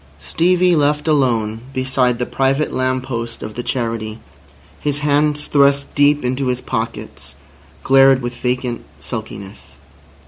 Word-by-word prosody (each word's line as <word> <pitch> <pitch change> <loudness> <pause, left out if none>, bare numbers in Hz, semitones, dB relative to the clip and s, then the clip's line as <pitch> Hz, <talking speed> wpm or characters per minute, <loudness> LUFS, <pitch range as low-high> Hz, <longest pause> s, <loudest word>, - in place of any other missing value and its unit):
Stevie 180 - +2
left 150 0 +1
alone 115 -7 +1
beside 130 -2 +1
the 125 - -2
private 135 +4 0
lamp 130 0 0
post 115 -3 -5
of 110 - -6
the 120 - -4
Charity, 115 -3 -3 0.6
his 145 -1 -2
hands 150 0 +1
thrust 140 -1 +2
deep 145 -1 +3
into 130 +2 -1
his 125 0 0
pockets, 115 -2 -5 0.5
glared 135 0 +5
with 120 0 -4
vacant 125 0 -2
sulkiness. 95 +7 -8
130 Hz, 130 wpm, -18 LUFS, 120-145 Hz, 0.6 s, glared